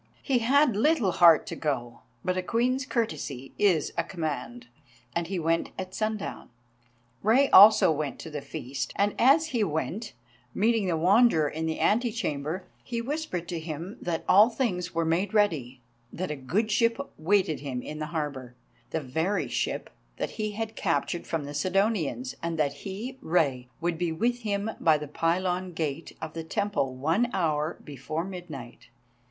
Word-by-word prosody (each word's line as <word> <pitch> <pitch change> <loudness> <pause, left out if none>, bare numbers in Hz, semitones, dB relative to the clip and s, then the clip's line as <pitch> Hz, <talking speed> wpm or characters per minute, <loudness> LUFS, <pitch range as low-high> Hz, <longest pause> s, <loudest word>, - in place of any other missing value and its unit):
He 265 -4 +2
had 265 +1 +4
little 240 - +3
heart 170 -3 +6
to - - -5
go, 120 -6 -3 0.3
but 185 - +1
a 185 - 0
Queen's 250 +7 0
courtesy 145 - -3
is 180 -7 +2
a - - +1
command, 140 -9 -4 0.5
and 170 -1 -1
he 190 +1 -3
went 165 0 0
at 185 -1 -5
sundown. 215 -1 -3 0.7
Rei 255 +6 +4
also 205 -3 +9
went 150 -3 -2
to 160 - -8
the 150 -1 -4
feast, 135 -3 -5
and 205 +1 +2
as 305 +6 +5
he 235 -4 +1
went, 165 - -3 0.4
meeting 220 -1 +2
the 170 -2 +1
Wanderer 185 -2 +4
in 160 +2 -3
the 160 - -2
ante 235 +3 +2
chamber, 155 0 -3 0.2
he 235 -1 -3
whispered 240 - -3
to 170 -2 -3
him 160 +4 -6
that 170 -2 -2
all 210 +5 +7
things 185 -9 -2
were 165 0 +1
made 185 +6 0
ready, 140 - +1 0.3
that 185 -1 -4
a - - -2
good 190 - -1
ship 230 +1 +3 0.2
waited 170 -2 +2
him 130 -3 -4
in 155 0 -7
the 155 - -3
harbour, 145 -6 -4 0.3
the 160 - -2
very 160 +9 -1
ship - - -2 0.3
that - - -3
he 215 -1 -3
had 220 +1 -4
captured 170 -1 -1
from 165 -3 -2
the 145 +1 -7
Sidonians, 195 - 0
and 165 -1 -2
that 145 -3 +1
he, 220 +7 -7
Rei, 140 -7 +1
would 170 0 -1
be 175 -2 0
with 235 +9 0
him 210 -1 -2
by 160 -3 +4
the 150 0 -6
pylon 180 +4 -1
gate 160 -1 -4
of 160 0 -6
the 165 - -5
temple 160 -6 -1
one 165 - +1
hour 155 -3 0
before 150 +3 -4
midnight. 165 -11 -9
175 Hz, 170 wpm, -27 LUFS, 155-215 Hz, 0.7 s, also